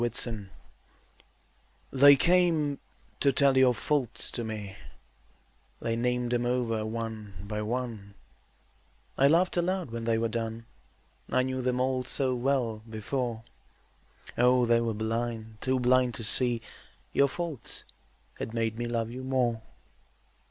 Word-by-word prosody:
Faults 120 0 0 1.6
They 140 +1 +8
came 165 -3 +2 0.4
to 140 - +4
tell 135 0 +4
your 130 -2 +5
faults 130 -1 -1
to 120 - -3
me, 105 -3 -5 1.0
They 115 - -1
named 125 +1 0
them 120 0 +1
over 120 -3 0
one 110 -2 -5
by 105 +1 -4
one; 110 -3 -4 1.0
I 135 - +5
laughed 175 +5 +3
aloud 180 -4 0
when 115 0 -4
they 115 -1 +2
were 115 +1 +1
done, 115 0 -4 0.6
I 130 - +2
knew 130 0 -2
them 125 0 0
all 130 0 +1
so 130 0 0
well 125 -3 0
before, 115 +1 -3 1.0
Oh, 125 0 +5
they 115 0 +3
were 115 -2 -1
blind, 110 0 -3
too 130 0 +1
blind 125 0 +3
to 115 - -4
see 120 +1 +1 0.5
Your 140 - +4
faults 160 -3 -5 0.6
had 115 - -5
made 115 0 -1
me 120 - -2
love 115 -1 -2
you 130 +2 -6
more. 125 -4 0
120 Hz, 135 wpm, -29 LUFS, 115-130 Hz, 1.6 s, They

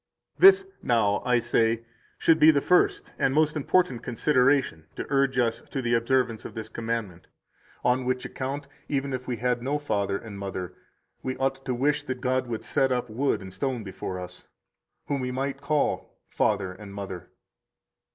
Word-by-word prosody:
125 - - -18 0.2
This, 390 - -25
now, 105 -4 +2
I 125 -1 +4
say 115 -1 +1 0.3
should 160 -1 +4
be 155 0 +8
the 145 -3 +5
first 180 +5 +2
and 135 - +2
most 155 0 +3
important 150 -4 +1
consideration 125 - +2
to - - -4
urge 135 -2 +2
us 115 -2 +1
to 135 - -3
the 120 -2 0
observance 115 -1 +1
of - - -9
this 110 -1 -6
commandment; 110 -6 -4 0.6
on 125 +1 +2
which 125 0 -1
account, 140 +2 -4 0.2
even 140 -1 -1
if 130 0 -4
we 125 -2 -2
had 125 +1 0
no 140 +4 0
father 100 -9 -1
and 100 -2 -9
mother, 95 -2 -5 0.5
we 130 0 -3
ought 135 0 -1
to 125 - -1
wish 145 +4 +1
that 130 -3 -5
God 130 0 0
would 115 -2 -4
set 135 -1 +1
up 125 -2 -1
wood 125 -2 0
and 95 -1 -9
stone 120 +4 -2
before 95 -1 -5
us, 90 0 -9 0.6
whom 140 -2 -1
we 125 - -2
might 135 +2 -3
call 145 +1 -1
father 95 -1 +1
and 100 +1 -10
mother. 95 -3 -6
125 Hz, 180 wpm, -26 LUFS, 110-135 Hz, 0.6 s, be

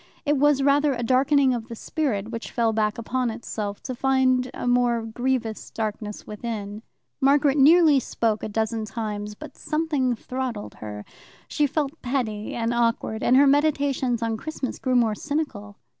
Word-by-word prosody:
It 295 0 +2
was 285 0 +3
rather 285 +1 +3
a 240 -1 -3
darkening 265 +2 +3
of 230 -2 -4
the 235 - -7
spirit 230 -6 -2
which 230 -1 -5
fell 230 -3 +1
back 215 -1 0
upon 245 +2 -1
itself, 210 -2 -5
to 260 - -4
find 255 0 +2
a - - -6
more 245 -1 +2
grievous 235 -1 -2
darkness 210 -1 -4
within. 210 -1 -5 0.4
Margaret 280 0 +4
nearly 310 0 +6
spoke 225 -4 -1
a - - -4
dozen 220 +1 -1
times, 210 -1 -5
but - - -11
something 300 -6 0
throttled 250 -2 -5
her. 105 -1 -7 0.4
She 295 -1 +1
felt 295 +2 -3
petty 240 -5 -2
and 230 0 -1
awkward, 230 -2 0
and 255 - +4
her 285 - +7
meditations 280 -4 +2
on 225 -1 -1
Christmas 285 0 -5
grew 255 -1 0
more 230 -3 +3
cynical. 215 -7 -4
245 Hz, 160 wpm, -24 LUFS, 220-275 Hz, 0.4 s, her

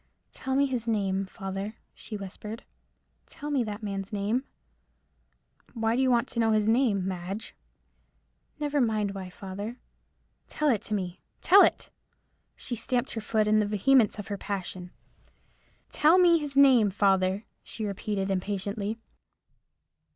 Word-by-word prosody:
"Tell 265 0 -3
me 280 +1 +4
his 250 -4 -3
name, 195 -3 0
father," 195 +1 -5 0.2
she 215 - -8
whispered; 210 +3 -8 0.6
"tell 295 +1 -7
me 270 -4 +2
that 210 +1 -6
man's 195 -1 -4
name." 210 +6 -1 1.3
"Why 225 0 +1
do 260 - +1
you 260 - +3
want 240 +1 +2
to 235 - -3
know 225 -1 +3
his 215 -1 +2
name, 220 -5 +2
Madge?" 190 +3 -5 1.1
"Never 290 -1 0
mind 215 -4 +1
why, 190 -2 -6
father. 200 +5 -7 0.7
Tell 305 -1 0
it 225 -7 +2
to 215 - 0
me—tell 195 - +2
it!" - - +2 0.6
She 245 - -4
stamped 245 +3 -1
her 225 - -4
foot 215 0 +1
in 215 0 +3
the 210 - +1
vehemence 220 +3 +3
of 205 +1 -7
her 200 -1 -4
passion. 185 -2 -4 1.0
"Tell 315 +4 +5
me 345 -2 +6
his 290 -2 -4
name, 260 -7 +6
father," 195 0 +1 0.2
she 220 - -6
repeated, 200 -1 -2
impatiently. 200 +3 -2
215 Hz, 145 wpm, -28 LUFS, 195-245 Hz, 1.3 s, me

